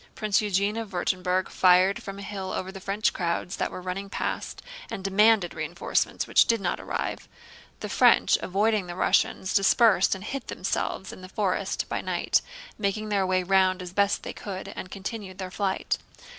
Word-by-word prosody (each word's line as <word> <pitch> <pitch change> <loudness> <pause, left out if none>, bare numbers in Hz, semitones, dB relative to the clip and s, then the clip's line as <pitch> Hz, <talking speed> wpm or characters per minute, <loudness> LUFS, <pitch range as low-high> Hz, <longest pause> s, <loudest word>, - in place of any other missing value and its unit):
Prince 215 -2 +1
Eugène 205 +2 0
of 220 - -8
Württemberg 185 0 0
fired 185 +1 +4
from 195 0 -7
a 200 - -7
hill 195 -1 -5
over 185 +1 -3
the 195 - -9
French 200 +3 0
crowds 170 +1 -2
that - - -1
were 180 - -8
running 190 +2 -4
past, - - -4 0.3
and 190 - -5
demanded 200 -1 +4
reinforcements - - -1
which - - +5
did 230 -1 +2
not 180 -3 -2
arrive. - - -4 0.5
The - - -3
French, - - +5
avoiding 205 0 +1
the 175 - -6
Russians, 185 0 +1
dispersed 195 0 +4
and 190 - -9
hid 265 +3 -5
themselves 190 0 -3
in - - -11
the 185 - -10
forest 190 -1 -1
by - - -2
night, - - +1 0.4
making 215 +1 -1
their 195 -2 +1
way 185 0 +1
round 190 0 +3
as 180 -1 -7
best 200 +1 +2
they - - -5
could, 195 -1 -6
and 185 - -7
continued 195 -1 -6
their 185 -1 -6
flight. 195 -1 -1
195 Hz, 180 wpm, -26 LUFS, 185-205 Hz, 0.5 s, which